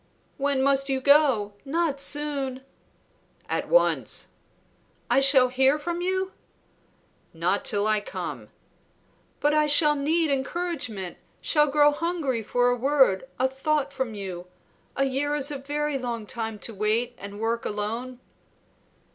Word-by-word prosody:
"When 275 Hz, -1 st, +1 dB
must 275 Hz, 0 st, +2 dB
you 265 Hz, -1 st, +1 dB
go? 265 Hz, -7 st, +4 dB
Not 290 Hz, -1 st, -1 dB
soon." 280 Hz, -3 st, -1 dB, 0.8 s
"At -, -, -2 dB
once." -, -, +2 dB, 0.8 s
"I -, -, +5 dB
shall 270 Hz, -2 st, +5 dB
hear 265 Hz, +3 st, +3 dB
from 340 Hz, +3 st, -4 dB
you?" 375 Hz, +1 st, -1 dB, 1.0 s
"Not -, -, 0 dB
till 205 Hz, -2 st, +1 dB
I 215 Hz, 0 st, +2 dB
come." -, -, -6 dB, 0.9 s
"But 295 Hz, +1 st, +3 dB
I 305 Hz, 0 st, +3 dB
shall 295 Hz, +1 st, +6 dB
need 310 Hz, +2 st, +1 dB
encouragement, 270 Hz, -, -3 dB, 0.2 s
shall 300 Hz, -1 st, +2 dB
grow 295 Hz, +1 st, +4 dB
hungry 295 Hz, -6 st, -2 dB
for 245 Hz, +3 st, +1 dB
a -, -, +1 dB
word, 265 Hz, -4 st, +2 dB
a 260 Hz, -, +2 dB
thought 270 Hz, +2 st, -1 dB
from 240 Hz, -5 st, -3 dB
you. 185 Hz, -3 st, -6 dB, 0.5 s
A 275 Hz, -, +1 dB
year 280 Hz, +2 st, 0 dB
is 290 Hz, 0 st, +1 dB
very 290 Hz, +1 st, -2 dB
long 235 Hz, -3 st, -4 dB
to 225 Hz, 0 st, -5 dB
wait 215 Hz, +4 st, 0 dB
and 200 Hz, +1 st, -8 dB
work 230 Hz, +1 st, -1 dB
alone." 230 Hz, +5 st, -4 dB
270 Hz, 130 wpm, -25 LUFS, 235-295 Hz, 1.0 s, shall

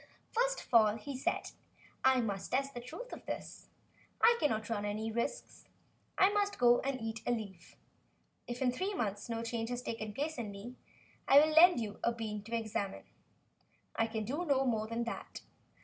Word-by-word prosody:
"First -, -, +1 dB
of -, -, -17 dB
all," 215 Hz, -2 st, +6 dB
he 275 Hz, +5 st, -6 dB
said, 260 Hz, -, -2 dB, 0.5 s
"I 260 Hz, -1 st, +5 dB
must 200 Hz, -4 st, -3 dB
test 275 Hz, +2 st, 0 dB
the 245 Hz, -, -6 dB
truth -, -, -8 dB
of -, -, -8 dB
this. -, -, -6 dB, 0.5 s
I 470 Hz, +1 st, +6 dB
cannot 220 Hz, -8 st, 0 dB
run 215 Hz, -3 st, -2 dB
any 215 Hz, +2 st, -2 dB
risks. 235 Hz, -, -4 dB, 0.5 s
I 380 Hz, -, +6 dB
must 410 Hz, 0 st, 0 dB
go 240 Hz, 0 st, +5 dB
and 270 Hz, -1 st, -2 dB
eat 225 Hz, 0 st, -4 dB
a -, -, +3 dB
leaf. 200 Hz, -7 st, -5 dB, 0.7 s
If 245 Hz, +2 st, -3 dB
in 250 Hz, -, +3 dB
three 380 Hz, +10 st, -2 dB
months 205 Hz, -, -3 dB
no 230 Hz, 0 st, -2 dB
change 230 Hz, 0 st, -3 dB
has 245 Hz, 0 st, -3 dB
taken 220 Hz, -3 st, -4 dB
place 290 Hz, +5 st, -3 dB
in 225 Hz, -3 st, -3 dB
me, 200 Hz, +5 st, -8 dB, 0.5 s
I 275 Hz, -, +7 dB
will 310 Hz, +1 st, +3 dB
lend 350 Hz, -1 st, +8 dB
you 210 Hz, -3 st, -5 dB
a 235 Hz, -, +3 dB
bean 220 Hz, -3 st, -4 dB
to 230 Hz, +1 st, -3 dB
examine. 215 Hz, -3 st, -3 dB, 0.9 s
I 225 Hz, -, +2 dB
can 220 Hz, -1 st, -3 dB
do 290 Hz, +10 st, -2 dB
no 275 Hz, -5 st, +2 dB
more 220 Hz, -3 st, 0 dB
than 230 Hz, +1 st, -2 dB
that. 235 Hz, -, -6 dB
235 Hz, 190 wpm, -33 LUFS, 220-275 Hz, 0.9 s, lend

